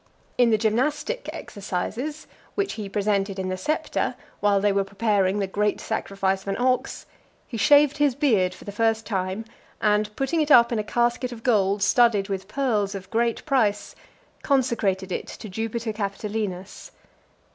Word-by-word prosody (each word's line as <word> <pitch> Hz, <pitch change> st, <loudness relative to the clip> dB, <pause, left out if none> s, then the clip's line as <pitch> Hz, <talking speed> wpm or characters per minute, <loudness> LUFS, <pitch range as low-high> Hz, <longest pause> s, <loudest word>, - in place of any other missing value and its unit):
In 245 Hz, -1 st, +4 dB
the 220 Hz, -, +4 dB
gymnastic 270 Hz, -, -1 dB
exercises, 230 Hz, +10 st, -5 dB, 0.3 s
which 400 Hz, -1 st, -1 dB
he 215 Hz, -3 st, -6 dB
presented 200 Hz, -1 st, 0 dB
in 190 Hz, -1 st, -2 dB
the 185 Hz, -, -1 dB
Septa, 300 Hz, +12 st, -1 dB, 0.2 s
while 205 Hz, -1 st, +3 dB
they 205 Hz, +1 st, +2 dB
were 200 Hz, 0 st, +2 dB
preparing 200 Hz, -1 st, +1 dB
the 200 Hz, -, 0 dB
great 205 Hz, +2 st, 0 dB
sacrifice 195 Hz, -3 st, -1 dB
of 195 Hz, -, -17 dB
an 195 Hz, -, -1 dB
ox, 255 Hz, +1 st, 0 dB, 0.4 s
he 240 Hz, -, -7 dB
shaved 290 Hz, +4 st, +5 dB
his 290 Hz, -4 st, +2 dB
beard 220 Hz, -11 st, +2 dB
for -, -, -14 dB
the 205 Hz, -, -5 dB
first 225 Hz, +1 st, +1 dB
time, 190 Hz, +1 st, -2 dB, 0.3 s
and 210 Hz, 0 st, +2 dB
putting 315 Hz, +4 st, 0 dB
it 300 Hz, -, -1 dB
up 235 Hz, -4 st, +7 dB
in 230 Hz, -, 0 dB
a -, -, -1 dB
casket 240 Hz, +3 st, 0 dB
of 230 Hz, -2 st, -9 dB
gold 200 Hz, -4 st, +2 dB
studded 210 Hz, -1 st, +3 dB
with 190 Hz, -1 st, -3 dB
pearls 210 Hz, -5 st, 0 dB
of 195 Hz, 0 st, -8 dB
great 230 Hz, 0 st, 0 dB
price, 225 Hz, -8 st, +1 dB, 0.5 s
consecrated 220 Hz, -9 st, 0 dB
it -, -, -3 dB
to 220 Hz, -, -9 dB
Jupiter 225 Hz, +3 st, -3 dB
Capitolinus. 200 Hz, -2 st, -4 dB
215 Hz, 165 wpm, -24 LUFS, 195-240 Hz, 0.5 s, up